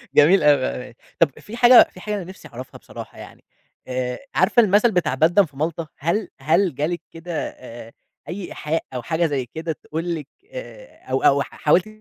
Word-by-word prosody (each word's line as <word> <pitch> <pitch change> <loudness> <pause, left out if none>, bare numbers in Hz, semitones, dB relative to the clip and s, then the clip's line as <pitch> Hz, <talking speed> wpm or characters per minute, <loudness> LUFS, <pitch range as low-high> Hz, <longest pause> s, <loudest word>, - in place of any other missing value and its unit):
جميل 165 +7 +6
أوي. 145 -3 +5 0.2
آآ 120 - -16 0.2
طَب 150 -5 +2
في 225 +4 -9
حاجة 245 0 +8
في 185 - -14
حاجة 210 +2 -3
أنا 195 - -4
نِفْسي 185 +3 -11
أعرفها 125 +2 -10
بصراحة - - -11
يعني، - - -12 0.4
آآ 125 -1 -3 0.2
عارفة 240 - +5
المَثل 210 +3 +4
بتاع 180 -9 0
بيدن 175 +7 +4
في 145 -3 -18
مالطا؟ 160 +1 -2
هل 175 +8 -1
هل 165 +4 +2
جا 145 +3 0
لِك 175 0 -3
كده 165 0 -4
آآ 115 -2 -12 0.4
أي 185 +1 -5
إيحاء 155 +2 -2
أو 125 - -3
حاجة 160 +7 0
زي 140 -5 -1
كده 160 +6 -5
تقول 165 +3 -4
لِك 150 -4 -7 0.2
آآ - - -10
أو 130 - 0
أو 140 0 +5
حاولتِ 175 +7 +1
165 Hz, 190 wpm, -22 LUFS, 140-190 Hz, 0.4 s, حاجة